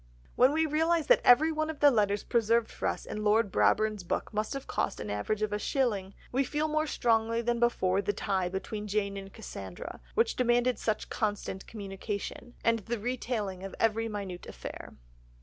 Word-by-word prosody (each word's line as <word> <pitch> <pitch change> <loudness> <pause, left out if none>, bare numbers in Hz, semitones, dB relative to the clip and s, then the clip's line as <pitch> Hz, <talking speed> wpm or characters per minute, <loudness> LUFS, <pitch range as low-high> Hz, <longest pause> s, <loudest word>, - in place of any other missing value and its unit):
'" - - -28
When 255 +2 +6
we 320 +2 +2
realise 320 +1 +2
that - - +5
every 300 +6 +6
one 310 0 -1
of 315 - -5
the 290 -1 +7
letters 205 -4 +1
preserved 230 0 +2
for - - -3
us - - -2
in 210 - -5
Lord 210 -1 +3
Brabourne's 205 - +2
book 175 - -3
must 215 +1 -1
have 275 -1 -5
cost - - -2
on 105 - -4
an - - -1
average 215 - -1
a 210 0 -1
shilling, 210 -6 -1 0.2
we 265 +2 +2
feel 300 +3 -1
more 310 0 0
strongly 230 -3 +1
than 235 0 0
before 195 -5 +2
the 205 +1 0
tie 190 -2 -1
between 210 +3 -4
Jane 200 -1 -1
and 195 0 -7
Cassandra, 95 - -8
which - - +2
demanded 245 -1 +2
such 215 -1 -2
constant 205 -3 -2
communication, 205 +3 -6
and 230 0 +3
the 235 +3 -3
retailing 220 -5 -3
of 195 - -6
every 225 0 +1
minute 195 -4 -6
affair. - - -8
215 Hz, 190 wpm, -30 LUFS, 200-245 Hz, 0.2 s, the